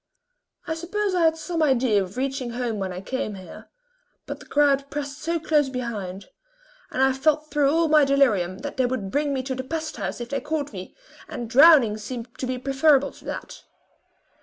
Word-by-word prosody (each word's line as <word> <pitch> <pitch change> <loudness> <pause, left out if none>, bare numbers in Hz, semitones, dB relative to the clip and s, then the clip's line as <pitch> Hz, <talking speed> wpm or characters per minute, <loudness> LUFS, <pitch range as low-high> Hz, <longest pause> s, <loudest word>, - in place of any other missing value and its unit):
I 320 - -2
suppose 380 +5 -2
I 350 -2 +3
had 320 0 +3
some 330 +1 -3
idea 255 -8 +3
of 190 +4 -7
reaching 265 -1 -2
home 235 -3 -2
when 190 -1 -3
I 180 +1 -6
came 215 -1 -3
here; 185 -1 -12 0.6
but - - -6
the - - -14
crowd 280 -1 +2
pressed 285 0 -5
so 335 +1 -1
close 300 -3 +2
behind, 210 -7 -5 0.6
and 260 - 0
I 265 0 +4
felt 305 +3 +1
though 290 -2 +3
all 325 +3 +2
my 305 -1 +5
delirium, 230 -11 +2
that 285 - -5
they 255 -1 +2
would 220 -7 -3
bring 290 0 0
me 265 -2 -1
to 260 0 -3
the 260 0 -4
pest 315 +2 -4
house 195 -1 -4
if 240 0 -6
they 275 - -2
caught 295 -4 -3
me, 185 -1 -8 0.3
and 240 - -5
drowning 265 -4 +6
seemed 235 +2 -7
to 255 - -2
me 255 0 -2
preferable 275 +2 +3
to - - -18
that. - - -7
270 Hz, 200 wpm, -24 LUFS, 235-300 Hz, 0.6 s, drowning